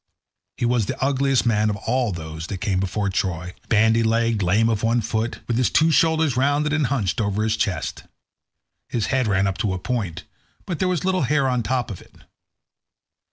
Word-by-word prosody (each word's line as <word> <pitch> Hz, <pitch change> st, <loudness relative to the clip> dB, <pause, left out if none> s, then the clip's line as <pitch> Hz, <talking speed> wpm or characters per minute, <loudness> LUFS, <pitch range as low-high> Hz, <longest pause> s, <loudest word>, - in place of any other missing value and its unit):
He -, -, -1 dB
was 120 Hz, -4 st, +1 dB
the -, -, -4 dB
ugliest 135 Hz, -1 st, +1 dB
man 110 Hz, -2 st, +2 dB
of 105 Hz, -, -1 dB
all 125 Hz, +2 st, -1 dB
those 80 Hz, -1 st, -6 dB
that 100 Hz, -, -4 dB
came 95 Hz, 0 st, -1 dB
before 95 Hz, +1 st, -1 dB
Troy—bandy 100 Hz, +5 st, 0 dB
legged, 115 Hz, -1 st, +1 dB
lame 100 Hz, +5 st, +3 dB
of 110 Hz, -3 st, 0 dB
one 115 Hz, +1 st, +2 dB
foot, 110 Hz, +1 st, -2 dB
with 115 Hz, -, 0 dB
his 125 Hz, -, +2 dB
two 160 Hz, +1 st, +3 dB
shoulders 160 Hz, -3 st, +3 dB
rounded 145 Hz, +3 st, +1 dB
and 155 Hz, -4 st, +1 dB
hunched 120 Hz, -6 st, -1 dB
over 105 Hz, 0 st, 0 dB
his 110 Hz, 0 st, +1 dB
chest. 90 Hz, -7 st, -2 dB, 0.8 s
His 115 Hz, -4 st, -1 dB
head 130 Hz, -3 st, +2 dB
ran 100 Hz, -1 st, +2 dB
up 95 Hz, -1 st, -2 dB
to 95 Hz, -3 st, 0 dB
a -, -, -3 dB
point, 95 Hz, -5 st, -3 dB, 0.4 s
but 175 Hz, -4 st, -4 dB
there 185 Hz, -, +1 dB
was 180 Hz, -1 st, -1 dB
little 185 Hz, -1 st, +1 dB
hair 140 Hz, -2 st, +2 dB
on 125 Hz, -2 st, +1 dB
the 110 Hz, -, -6 dB
top 125 Hz, -2 st, -1 dB
of 95 Hz, -, -8 dB
it. -, -, -20 dB
115 Hz, 200 wpm, -22 LUFS, 100-130 Hz, 0.8 s, lame